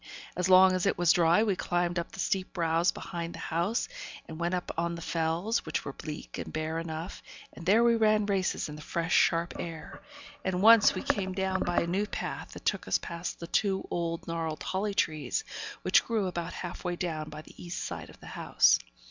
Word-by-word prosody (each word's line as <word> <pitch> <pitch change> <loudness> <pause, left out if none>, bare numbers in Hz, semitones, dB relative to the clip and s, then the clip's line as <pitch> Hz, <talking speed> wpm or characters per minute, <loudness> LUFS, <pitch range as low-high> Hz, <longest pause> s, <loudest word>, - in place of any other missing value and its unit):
As 180 0 0
long 185 0 +8
as 185 +1 +1
it - - +1
was 175 -1 +5
dry, 170 +4 +4
we 205 -4 +1
climbed 175 -1 0
up 170 - -5
the - - -11
steep 190 -1 -1
brows 165 0 +2
behind 170 -1 -5
the - - -6
house, 175 +8 +1 0.4
and 160 0 -8
went 175 +2 0
up 180 - -3
on 170 +1 -1
the 170 - -7
Fells, 165 +7 0
which 155 - -3
were 140 - -4
bleak 150 +1 -7
and - - -5
bare 155 +1 -2
enough, 165 +2 -5 0.3
and 170 - -10
there 220 +5 +6
we 235 -1 +5
ran 215 -2 +3
races 195 -2 0
in 150 - -7
the 150 - -9
fresh, 170 +2 -2
sharp 170 0 +3
air; 165 -2 -7 0.4
and 190 0 -1
once 225 -1 +8
we - - -3
came 190 -2 0
down 190 0 0
by 175 - +1
a - - 0
new 190 +5 0
path, - - -5
that - - -11
took - - 0
us - - +3
past 170 +1 -5
the 170 - -5
two 195 +2 0
old 170 -1 -2
gnarled 165 -2 -3
holly 200 +2 -1
trees, 155 - 0 0.4
which - - +5
grew 220 -4 0
about 175 -2 -3
half 175 -1 -6
way 175 -1 -1
down 160 -4 -3
by 155 +1 -8
the - - -15
east 175 0 -4
side - - -6
of - - -15
the - - -12
house. - - +4
175 Hz, 215 wpm, -29 LUFS, 165-190 Hz, 0.4 s, long